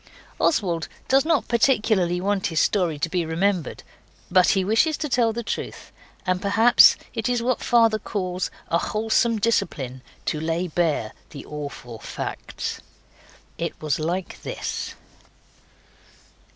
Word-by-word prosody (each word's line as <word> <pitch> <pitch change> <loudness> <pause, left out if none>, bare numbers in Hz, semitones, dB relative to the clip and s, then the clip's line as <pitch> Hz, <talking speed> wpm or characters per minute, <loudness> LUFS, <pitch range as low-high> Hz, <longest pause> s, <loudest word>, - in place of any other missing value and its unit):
Oswald 175 - +1 0.2
does 270 +2 +4
not 325 -3 +2
particularly 215 -7 +2
want 195 +1 0
his 160 -2 0
story 175 -7 +1
to 150 - -1
be 175 +1 -1
remembered, 170 0 -1 0.5
but 185 0 +5
he 190 - +1
wishes 230 - +2
to 300 - -2
tell 240 -4 +2
the 235 +1 -4
truth, - - -5 0.3
and 185 -1 0
perhaps 225 +4 +6 0.2
it 225 +2 -2
is 245 -1 0
what 255 +1 0
father 230 -3 +4
calls 185 -4 -3 0.2
a 170 - +2
wholesome 225 +3 +1
discipline 145 - -1 0.2
to 155 - -1
lay 165 +3 -1
bare 155 -9 0 0.2
the 140 - -9
awful 140 -6 -7
facts. - - -5 0.8
It - - -3
was 150 -2 -1
like 175 +4 -3
this. - - -4
190 Hz, 135 wpm, -24 LUFS, 165-230 Hz, 0.8 s, perhaps